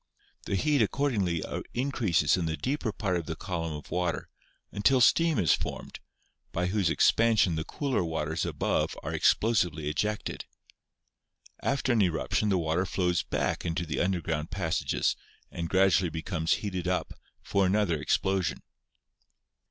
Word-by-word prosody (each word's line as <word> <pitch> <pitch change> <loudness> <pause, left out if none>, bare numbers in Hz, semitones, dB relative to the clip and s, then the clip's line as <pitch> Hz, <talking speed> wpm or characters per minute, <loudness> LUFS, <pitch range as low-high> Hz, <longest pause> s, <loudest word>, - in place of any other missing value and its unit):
The - - 0
heat 145 +7 +2
accordingly 105 - 0 0.3
increases 110 - +2
in 90 -3 -1
the 80 0 -2
deeper 130 -4 -2
part 95 -4 -1
of 85 - -5
the 80 - -3
column 85 -4 -4
of 75 0 -9
water, 90 -1 -1 0.4
until 130 +6 +3
steam 165 +4 +4
is 85 -7 +4
formed, - - -4 0.5
by 90 - -1
whose 95 -1 +1
expansion 110 +1 +3
the 80 0 -2
cooler 135 - -1
waters 80 -1 -2
above - - -1
are - - -4
explosively 90 -9 +2
ejected. 105 +8 -2 1.2
After 135 -2 0
an 115 - +3
eruption 95 +3 +1
the 95 - +3
water 85 +2 0
flows 90 -5 +1
back - - -2
into 85 0 -2
the 75 -5 -3
underground 85 -4 -1
pas 90 -3 -1
sages - - 0 0.4
and 85 -1 -4
gradually 95 -1 +3
becomes 80 0 -1
heated 90 -3 -3
up 90 0 -1 0.3
for 100 -1 +1
another 95 -5 +1
ex - - +2
plosion. 95 -3 -1
90 Hz, 145 wpm, -28 LUFS, 80-105 Hz, 1.2 s, steam